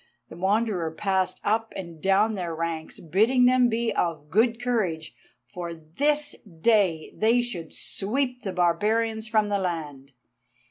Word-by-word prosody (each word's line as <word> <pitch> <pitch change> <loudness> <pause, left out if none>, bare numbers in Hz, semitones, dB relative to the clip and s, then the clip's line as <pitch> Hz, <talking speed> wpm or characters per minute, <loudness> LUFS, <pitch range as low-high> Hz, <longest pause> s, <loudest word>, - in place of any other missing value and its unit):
The - - -10
Wanderer 190 -1 0
passed 190 +3 -1
up 225 +2 0
and 170 -4 -8
down 200 +3 +3
their 175 -5 -3
ranks, 165 -1 -4
bidding 220 - +3
them 250 -1 +5
be 230 0 0
of 155 -4 -2
good 230 +4 +3
courage, 200 -11 -1 0.4
for 175 -3 -5
this 290 - -1
day 185 -3 +1
they 235 +3 +3
should 175 -10 -6
sweep 250 +5 -2
the 195 - -4
barbarians 220 +6 +1
from 215 -1 +2
the 200 -1 +1
land. 150 -7 -4
195 Hz, 140 wpm, -26 LUFS, 170-230 Hz, 0.4 s, them